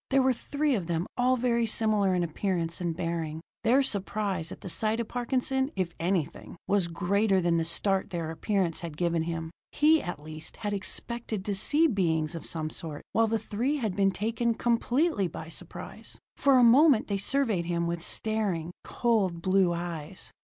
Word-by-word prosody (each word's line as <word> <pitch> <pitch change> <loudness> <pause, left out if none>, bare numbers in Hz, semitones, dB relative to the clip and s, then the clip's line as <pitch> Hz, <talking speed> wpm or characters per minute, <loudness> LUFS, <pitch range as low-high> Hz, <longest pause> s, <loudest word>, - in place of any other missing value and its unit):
There 270 -1 +4
were 260 0 +4
three 285 +4 -1
of 190 -8 -1
them, 170 0 -1
all 255 +1 +2
very 235 -1 +1
similar 210 -4 +2
in 175 - +1
appearance 170 0 -2
and 170 -2 -1
bearing. 165 -3 -3 0.2
Their 255 +5 +4
surprise 200 -6 -2
at - - -9
the - - -7
sight 215 +5 0
of 230 - -2
Parkinson, 265 +3 -1
if 185 -3 -2
anything, 175 -1 -2
was 200 -3 +2
greater 195 +3 +1
than 170 -1 +2
the 165 - +1
start 190 +4 +1
their 170 -4 -3
appearance 175 0 -1
had 165 -3 -7
given 170 -1 +1
him. 165 0 -4 0.2
He, 310 +1 +4
at 175 -4 -5
least, 155 +1 -8
had 205 -2 -3
expected 215 +1 -3
to 205 - -1
see 295 +11 +3
beings 170 - +1
of 165 - -5
some 155 -1 -3
sort, 155 -4 -6
while 225 0 +3
the 225 +1 +1
three 230 +7 -1
had 220 -9 -2
been 195 0 +3
taken 225 +4 -1
completely 240 - +1
by 160 0 -8
surprise. - - -9 0.2
For 275 -2 +4
a 250 - +6
moment 260 +1 +6
they 200 -1 -1
surveyed 220 -6 +1
him 170 0 -1
with 170 0 -2
staring, 195 -5 -1
cold 210 -8 0
blue 185 -1 +3
eyes. 170 0 -5
195 Hz, 180 wpm, -28 LUFS, 170-235 Hz, 0.2 s, a